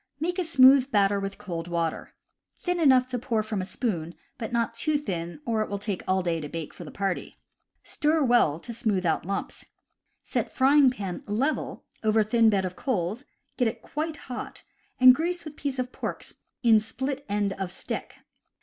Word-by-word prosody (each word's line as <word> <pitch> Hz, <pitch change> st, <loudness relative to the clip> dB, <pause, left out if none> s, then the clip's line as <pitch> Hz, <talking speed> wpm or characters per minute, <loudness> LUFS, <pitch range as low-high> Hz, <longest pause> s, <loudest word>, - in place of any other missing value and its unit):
Make 355 Hz, +4 st, -1 dB
a -, -, +2 dB
smooth 270 Hz, -4 st, +6 dB
batter 200 Hz, -4 st, +3 dB
with 195 Hz, 0 st, -4 dB
cold 170 Hz, -3 st, -5 dB
water 170 Hz, -2 st, -2 dB, 0.2 s
— -, -, -47 dB
thin 355 Hz, -1 st, 0 dB
enough 260 Hz, -5 st, +5 dB
to 250 Hz, -1 st, -2 dB
pour 225 Hz, -2 st, 0 dB
from 215 Hz, -2 st, -3 dB
a -, -, -3 dB
spoon, 175 Hz, -7 st, -3 dB, 0.2 s
but 225 Hz, -, -4 dB
not 235 Hz, -1 st, 0 dB
too 295 Hz, +6 st, +1 dB
thin, 175 Hz, -, -4 dB
or 225 Hz, -2 st, 0 dB
it 215 Hz, -, -2 dB
will 200 Hz, -, -2 dB
take 200 Hz, -2 st, -4 dB
all 185 Hz, 0 st, +2 dB
day 165 Hz, -2 st, -1 dB
to 150 Hz, -, -6 dB
bake 165 Hz, -1 st, -5 dB
enough -, -, -20 dB
for -, -, -7 dB
the -, -, -8 dB
party. 195 Hz, -2 st, -3 dB, 0.5 s
Stir 305 Hz, +1 st, +1 dB
well, 240 Hz, -, +3 dB
to 235 Hz, -, -7 dB
smoothe 215 Hz, -5 st, 0 dB
out 160 Hz, 0 st, 0 dB
lumps. 195 Hz, 0 st, -4 dB, 0.6 s
Set -, -, -2 dB
frying 275 Hz, +1 st, +5 dB
pan 200 Hz, -8 st, -5 dB
level 250 Hz, +9 st, -1 dB, 0.2 s
over 220 Hz, 0 st, +4 dB
thin 225 Hz, +1 st, +4 dB
bed 195 Hz, -3 st, +1 dB
of 180 Hz, 0 st, -5 dB
coals, 220 Hz, 0 st, -2 dB, 0.3 s
get 245 Hz, -, +3 dB
it 225 Hz, -, -4 dB
quite 310 Hz, +1 st, -3 dB
hot, 250 Hz, -3 st, -7 dB, 0.4 s
and 255 Hz, 0 st, +10 dB
grease 345 Hz, +5 st, -2 dB
with 305 Hz, -1 st, -8 dB
piece 280 Hz, -3 st, -3 dB
of 255 Hz, 0 st, -2 dB
pork -, -, -5 dB, 0.4 s
in 225 Hz, -2 st, +6 dB
split 265 Hz, +6 st, -4 dB
end 205 Hz, -1 st, 0 dB
of 190 Hz, -2 st, -5 dB
stick. -, -, -6 dB
225 Hz, 195 wpm, -27 LUFS, 195-265 Hz, 0.6 s, and